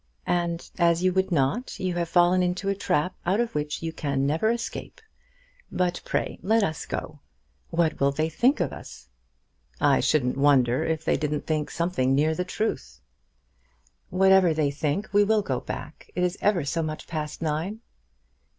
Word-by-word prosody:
"And 170 -1 -1
as 170 0 +3
you 185 0 +3
would 190 0 +1
not, 165 - 0
you 185 -2 -1
have 170 -1 -2
fallen 175 +1 +4
into 180 +2 -1
a - - +2
trap 185 -3 0
out 190 +5 +1
of 235 -1 -1
which 150 +1 -3
you 165 0 -3
can 140 -3 -1
never 160 +10 +1
escape. 235 0 -4 0.7
But 180 -1 -1
pray - - -2
let 220 +2 +2
us 160 -6 -3
go. - - -5 0.5
What 165 -1 0
will 140 0 +3
they 155 +3 0
think 240 - +2
of 175 -6 -1
us?" 65 - -11 0.7
"I - - +4
shouldn't 130 -4 +1
wonder 130 -3 +3
if 160 -1 -2
they - - +2
didn't 150 -1 -2
think 155 -2 -1
something 165 -7 0
near 155 +3 +2
the 180 - -2
truth." 70 - -3 1.1
"Whatever 190 -2 +4
they 150 -2 +1
think, 150 +8 -2
we 205 0 +6
will 215 0 +2
go 130 -8 -1
back. 150 +2 -8
It 180 - 0
is 180 0 +1
ever 190 -8 +2
so 165 +3 -1
much 155 -1 -4
past 155 -1 -5
nine." 165 +8 -2
170 Hz, 175 wpm, -26 LUFS, 150-185 Hz, 1.1 s, we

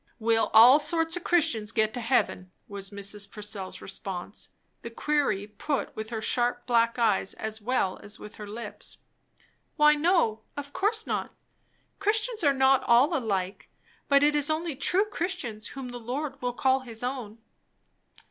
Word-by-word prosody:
"Will 225 -1 +1
all 240 +6 +8
sorts 325 +2 +1
of 355 - -5
Christians 225 -11 +1
get 220 -1 +1
to 245 - -4
heaven," 225 -6 0 0.2
was 200 -1 -6
Mrs. 200 0 -4
Purcell's 205 -3 -6
response, 195 0 -6 0.3
the 235 - -6
query 255 -5 0
put 215 +7 -3
with 220 0 -5
her 220 -1 -4
sharp 245 +1 +1
black 230 -1 +2
eyes 225 -4 +1
as 220 0 -4
well 210 -5 0
as 205 +1 -4
with 210 - -11
her 210 - -8
lips. 225 +3 -8 0.8
"Why 300 0 +6
no! 300 - +2 0.2
Of 285 0 -6
course 435 +3 +1
not. - - -3 0.6
Christians 425 +1 0
are 285 - +5
not 265 -1 +3
all 240 +4 +4
alike; 195 -6 -2 0.4
but 280 0 +5
it 295 0 +4
is 290 0 +2
only 315 -1 -1
true 380 +9 +2
Christians 340 - -4
whom 270 -2 -7
the 245 0 -7
Lord 265 +6 -5
will 245 0 -2
call 265 +2 +2
his 235 -3 -7
own." 245 -4 -4
245 Hz, 160 wpm, -27 LUFS, 215-295 Hz, 0.8 s, all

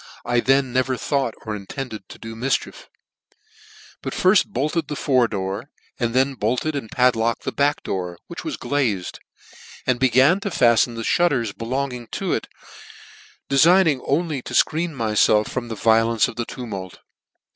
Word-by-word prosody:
I 120 0 +2
then 135 0 +2
never 130 0 +1
thought 135 -4 -1
or 110 -1 -3
intended 110 0 -7
to - - -10
do 115 0 -8
mifchieG 130 +4 -2 1.2
but - - -5
rirtt 185 +2 +4
bolted 155 -3 -1
the 150 - -4
fore 130 -4 +2
door, 100 +5 -4 0.3
and 120 -1 -1
then 135 +2 +3
bolted 125 +6 -1
and 135 -6 -4
padlocked 115 -2 +1
the - - -2
back 145 +1 0
door* 90 -2 -4
which - - -8
was - - -4
glazed, 115 -11 -1 0.7
and 125 -2 +1
began 135 - +4
to 200 - -3
fallen 120 - +3
the 115 - -4
fhutters 125 -10 +1
belonging 125 0 -3
to - - -1
it, - - -2 1.0
de 140 - 0
figning 165 -4 +5
only 150 -1 0
to - - -6
fcreen 165 +3 +2
myfelf 110 -3 +2
from 125 -2 -4
the 115 - -5
violence 115 +1 +3
of 120 - -8
the 120 0 -3
tumult. 100 -9 -7
125 Hz, 160 wpm, -22 LUFS, 115-140 Hz, 1.2 s, figning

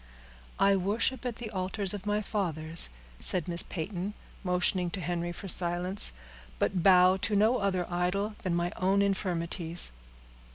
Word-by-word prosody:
"I 195 0 +4
worship 225 +6 0
at 240 - -3
the 225 -2 -7
altars 190 0 +1
of 205 0 -6
my 210 +1 +1
fathers," 165 -6 0 0.3
said 180 -4 0
Miss 170 -1 +2
Peyton, 190 +3 -5 0.3
motioning 180 0 +1
to 190 - -5
Henry 175 0 -2
for 195 +3 -8
silence; 180 - +1 0.5
"but 185 - 0
bow 185 0 +6
to 205 +2 -1
no 220 +5 +4
other 185 -3 0
idol 180 +4 -1
than 180 -3 -1
my 175 0 0
own 195 +2 +2
infirmities." 175 - 0
185 Hz, 150 wpm, -29 LUFS, 175-200 Hz, 0.5 s, bow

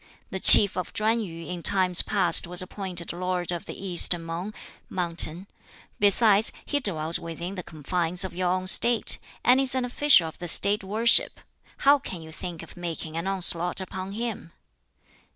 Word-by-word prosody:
The 190 - -6
Chief 200 +2 +9
of 180 - -6
Chuen 225 +2 -2
yu 165 -5 -10
in 180 -1 -8
times 185 -1 +3
past 200 -3 +1
was 180 +1 +4
appointed 185 -3 -7
lord 180 0 -5
of 175 -1 -7
the - - -10
East 175 -1 +6
Mung 165 +4 -8 0.4
(mountain); 170 0 -3 0.5
besides, 205 +1 +1
he 290 - -3
dwells 165 - -1
within 170 +3 -9
the 185 - -8
confines 170 +3 -3
of 190 - -8
your 180 0 -3
own 185 +1 -3
State, 235 +5 +3 0.2
and 250 +2 +2
is 265 -1 +5
an 255 -1 -2
official 250 - +2
of 160 - -13
the 175 - -8
State 200 +4 +2
worship; 220 +4 0 0.5
how 285 +1 +4
can 175 -9 -10
you 160 - -14
think 170 0 -10
of 165 - -15
making 165 -2 -8
an 165 +3 -6
onslaught 180 -2 0
upon 190 +1 -9
him?" 220 -6 -7
185 Hz, 170 wpm, -23 LUFS, 170-205 Hz, 0.5 s, Chief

